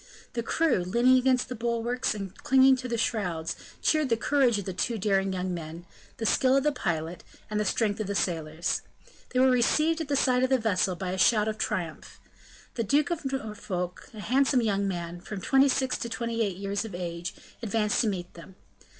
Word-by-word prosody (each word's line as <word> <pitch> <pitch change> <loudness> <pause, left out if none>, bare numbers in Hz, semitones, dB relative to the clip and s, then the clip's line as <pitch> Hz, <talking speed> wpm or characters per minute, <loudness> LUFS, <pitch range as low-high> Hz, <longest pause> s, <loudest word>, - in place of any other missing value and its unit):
The 235 - -1
crew, 320 +7 +1
leaning 235 +8 +3
against 255 0 +2
the - - -5
bulwarks 235 +1 -1
and 195 -3 -6
clinging 265 0 +5
to 255 0 -5
the 235 -1 -2
shrouds, 180 -8 -1 0.3
cheered 310 -3 +2
the 230 - +2
courage 255 -2 +2
of 200 - -4
the 190 - -4
two 230 +5 -1
daring 195 -1 +1
young 185 0 -2
men, 165 0 -7 0.3
the 225 - -3
skill 260 +4 +3
of 275 - +1
the 300 - +3
pilot, 170 - -3 0.3
and 210 - 0
the 210 - 0
strength 210 0 0
of 215 - -2
the 200 - -2
sailors. 165 -2 -1 0.5
They 255 - 0
were 260 0 +5
received 305 +7 +2
at 320 - -4
the 285 - 0
side 255 -2 +3
of 260 - +2
the 265 - +4
vessel 195 -5 +1
by 180 +1 -4
a 190 - -3
shout 210 +2 +4
of 215 0 -3
triumph. 165 -4 -4 0.5
The 230 - -1
Duke 290 - +2
of 305 -5 -2
Norfolk, 205 -8 -4
a 210 - -7
handsome 260 +2 +2
young 200 -2 +1
man, 175 -2 -4
from 200 +2 -6
twenty 270 +7 +4
six 260 0 0
to 235 - -4
twenty 230 0 -2
eight 200 -5 -1
years 200 +1 -2
of 220 -5 -7
age, 170 -1 -5 0.3
advanced 215 -2 +1
to 230 - +1
meet 180 -4 -3
them. 175 +2 -13
215 Hz, 210 wpm, -27 LUFS, 185-255 Hz, 0.5 s, clinging